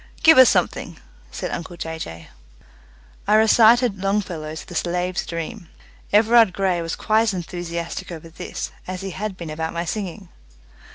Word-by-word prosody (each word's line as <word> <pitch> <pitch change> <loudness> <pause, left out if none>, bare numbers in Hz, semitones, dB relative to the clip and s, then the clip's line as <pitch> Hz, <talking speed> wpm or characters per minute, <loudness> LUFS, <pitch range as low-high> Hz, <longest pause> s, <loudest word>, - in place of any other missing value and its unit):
"Give 320 -4 +8
us 260 - +9
something," - - -1 0.3
said - - -5
uncle 170 +1 -6
Jay 160 -1 -5
Jay. 80 - -8 1.0
I 210 - +4
recited 220 0 +5
Longfellow's 180 -6 -2
"The - - -11
Slave's 180 +1 -2
Dream". 170 +2 -6 0.4
Everard 220 -1 +5
Grey 185 -3 0
was 165 -1 -3
quite 220 +1 +2
as 220 -4 0
enthusiastic 175 +1 -5
over 165 -1 -9
this 180 +2 -6 0.2
as 185 0 -5
he 195 0 -5
had 195 +1 -5
been 170 -3 -7
about 160 +1 -3
my 170 +1 -2
singing. 195 -1 -5
180 Hz, 155 wpm, -22 LUFS, 170-210 Hz, 1.0 s, us